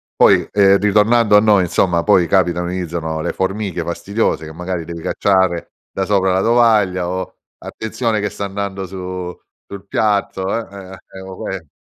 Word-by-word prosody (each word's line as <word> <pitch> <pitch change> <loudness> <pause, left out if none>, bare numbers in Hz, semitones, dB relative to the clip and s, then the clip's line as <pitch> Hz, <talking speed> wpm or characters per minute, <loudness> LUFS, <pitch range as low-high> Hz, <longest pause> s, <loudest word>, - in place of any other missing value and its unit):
Poi - - +4
ehm, 100 0 +4
ritornando 105 +1 +4
a - - +8
noi 105 -2 +4
insomma 90 0 +1
poi 95 -1 +3
capitano, 90 0 +1
iniziano 85 -3 -3
le 85 - -2
formiche 95 -2 -3
fastidiose 85 0 -2
che 80 - -9
magari 90 +1 -4
devi 85 0 -8
cacciare 95 -3 0 0.2
da 95 - -2
sopra 95 -2 +2
la 95 - +2
tovaglia 105 -6 +3
o: 95 0 -5 0.2
"Attenzione 110 0 -3
che 105 - -2
sta 100 - -5
andando 100 -1 -4
su 90 -1 -6 0.3
sul 100 0 -9
piatto." 100 -3 0
Ehm, 115 -3 -3 0.2
ehm, 95 - -10 0.2
eh, 95 - -9
o 95 0 -9
que - - -4
eh. 80 -4 -16
95 Hz, 175 wpm, -18 LUFS, 90-105 Hz, 0.3 s, a